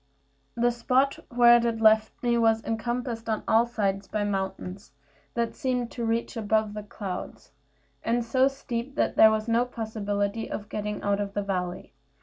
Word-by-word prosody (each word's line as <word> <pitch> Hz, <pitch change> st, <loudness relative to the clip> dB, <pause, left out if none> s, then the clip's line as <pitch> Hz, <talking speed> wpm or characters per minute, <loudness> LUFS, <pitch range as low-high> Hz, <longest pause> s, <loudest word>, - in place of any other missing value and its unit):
The 240 Hz, +1 st, +2 dB
spot 255 Hz, +3 st, +1 dB
where 240 Hz, 0 st, +7 dB
it 230 Hz, -1 st, 0 dB
left 220 Hz, +1 st, +3 dB
me 240 Hz, -1 st, +2 dB
was 225 Hz, -1 st, +3 dB
encompassed 235 Hz, 0 st, -3 dB
on 220 Hz, -, -1 dB
all 225 Hz, +2 st, +4 dB
sides 200 Hz, -4 st, -1 dB
by 210 Hz, +1 st, -2 dB
mountains, 190 Hz, -3 st, -4 dB, 0.4 s
that 235 Hz, -1 st, -1 dB
seemed 250 Hz, -2 st, -2 dB
to 240 Hz, -, -5 dB
reach 230 Hz, +2 st, -1 dB
above 215 Hz, -1 st, 0 dB
the 210 Hz, -, -5 dB
clouds, 200 Hz, -6 st, -7 dB, 0.5 s
and 235 Hz, +1 st, 0 dB
so 260 Hz, +3 st, +3 dB
steep 270 Hz, -1 st, -5 dB
that -, -, 0 dB
there 220 Hz, -, +8 dB
was 220 Hz, 0 st, -1 dB
no 230 Hz, +1 st, +3 dB
possibility 215 Hz, -2 st, -3 dB
of 205 Hz, 0 st, -6 dB
getting 210 Hz, 0 st, -4 dB
out 200 Hz, 0 st, +1 dB
of 200 Hz, -1 st, -5 dB
the 205 Hz, -, 0 dB
valley. 180 Hz, -2 st, -4 dB
225 Hz, 165 wpm, -27 LUFS, 205-235 Hz, 0.5 s, there